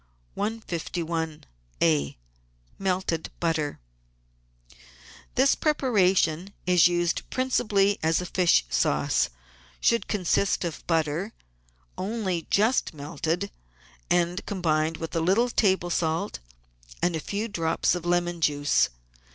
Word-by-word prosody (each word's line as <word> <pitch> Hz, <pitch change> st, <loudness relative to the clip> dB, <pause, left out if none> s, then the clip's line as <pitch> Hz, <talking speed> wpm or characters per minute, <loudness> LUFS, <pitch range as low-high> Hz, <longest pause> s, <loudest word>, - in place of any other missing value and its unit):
iSia 160 Hz, -, -2 dB, 0.6 s
MELTED 185 Hz, -4 st, -1 dB
BUTTER 160 Hz, -3 st, -1 dB, 1.6 s
This 270 Hz, +2 st, +5 dB
preparation, 195 Hz, -, +2 dB
which 180 Hz, -, +2 dB
is 170 Hz, -1 st, +7 dB
used 175 Hz, -1 st, -1 dB
principally 210 Hz, -6 st, +1 dB
as 160 Hz, +1 st, +2 dB
a 180 Hz, -, -4 dB
fish 175 Hz, -, +3 dB
sauce, -, -, +1 dB, 0.5 s
should 235 Hz, -, +2 dB
consist 195 Hz, -1 st, +1 dB
of 165 Hz, -, -5 dB
butter, 165 Hz, +5 st, 0 dB, 0.7 s
only 190 Hz, -4 st, -2 dB
just 215 Hz, -4 st, +2 dB
melted, 160 Hz, +6 st, -3 dB, 0.6 s
and 175 Hz, +2 st, +1 dB
combined 160 Hz, -4 st, 0 dB
with 165 Hz, 0 st, -6 dB
a 165 Hz, -, +1 dB
little 210 Hz, +9 st, +2 dB
table 190 Hz, -5 st, +2 dB
salt 165 Hz, +4 st, -1 dB, 0.6 s
and 175 Hz, -1 st, +2 dB
a -, -, -1 dB
few 205 Hz, +7 st, -3 dB
drops 165 Hz, -7 st, 0 dB
of 175 Hz, -2 st, -3 dB
lemon 175 Hz, -1 st, 0 dB
juice. 145 Hz, -1 st, +2 dB
175 Hz, 105 wpm, -26 LUFS, 160-200 Hz, 1.6 s, is